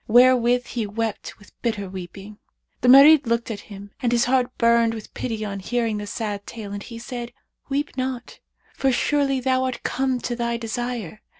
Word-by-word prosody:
Herewith 245 0 +5
he 230 -4 -3
wept 220 +1 -4
with 205 - -18
bitter 215 -4 -2
weeping. 195 +3 -9 0.4
The 250 - +1
Marid 280 +2 +8
looked 235 0 0
at 210 - -5
him 200 0 -10
and 240 -2 +1
his 240 0 +3
heart 250 0 +2
burned 230 -1 +3
with 220 - -10
pity 220 -3 -3
on 200 -1 -4
hearing 230 +2 -1
the 205 0 -5
sad 205 -2 -4
tale, 210 -4 -7
and 205 - -5
he 230 +2 -9
said, 240 0 -6 0.4
'Weep 285 +1 -2
not, 255 -2 -4 0.3
for 270 - +1
surely 275 +1 +1
thou 260 0 +1
art 255 -1 -4
come 260 -1 0
to 240 - -3
thy 235 0 -1
desire. 230 -3 -4
235 Hz, 185 wpm, -23 LUFS, 215-255 Hz, 0.4 s, Marid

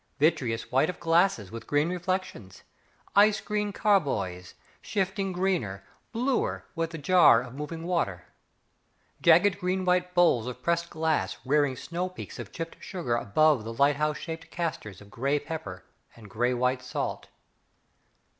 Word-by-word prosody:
Vitreous 130 -7 +1
white 135 +6 +3
of 180 - -5
glasses 165 - +2
with 115 0 -8
green 145 +2 +2
reflections, 180 - -4 0.5
Ice 205 +1 +5
green 210 -1 -2
carboys, 110 - 0 0.3
shifting 195 0 -1
greener, 180 - -1 0.3
bluer 250 +3 -1
with 165 -1 -2
the 165 - -7
jar 165 -5 +6
of 125 -1 -10
moving 150 +4 -6
water. 165 - -1 1.0
Jagged 180 +4 +5
green 185 0 -1
white 180 0 +1
bowls 150 -10 +4
of 125 0 -7
pressed 170 0 0
glass 160 -1 -1
Rearing 145 -1 +2
snow 175 +7 -4
peaks 185 - -9
of - - -7
chipped 165 -1 -6
sugar 170 - -2
Above 130 +3 +3
the 115 +1 -6
lighthouse 145 +4 +2
shaped 165 0 -7
castors 160 - -4
Of 100 0 -15
grey 140 +4 0
pepper 140 - -7 0.3
and 115 -3 -13
grey 125 +3 +1
white 125 +1 0
salt. 125 - -4
160 Hz, 145 wpm, -27 LUFS, 125-180 Hz, 1.0 s, jar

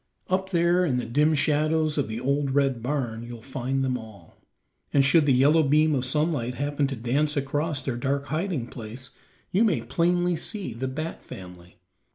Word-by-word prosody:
Up 190 +1 0
there 175 0 +3
in 135 -8 +1
the 125 - -2
dim 150 +7 +2
shadows 155 +1 +1
of 145 - 0
the 110 +1 -4
old 140 +1 0
red 135 -4 +2
barn 120 -3 -2
you'll 120 -1 -9
find 135 0 -2
them 130 -1 -1
all, 105 -7 -14 0.5
and 140 -1 +4
should 145 +2 +4
the - - +5
yellow 140 +5 +5
beam 155 +2 +3
of 130 -2 0
sunlight 140 -3 0
happen 145 +1 0
to 135 - -4
dance 140 +6 0
across 145 +1 -1
their 125 -3 -2
dark 140 +2 -1
hiding 155 -4 -2
place, 120 +2 -9 0.4
you 200 +5 +3
may 205 -8 +2
plainly 175 +1 +1
see 185 - -4
the 125 +4 -3
bat 155 +5 -5
family. 90 -1 -11
140 Hz, 185 wpm, -26 LUFS, 125-155 Hz, 0.5 s, the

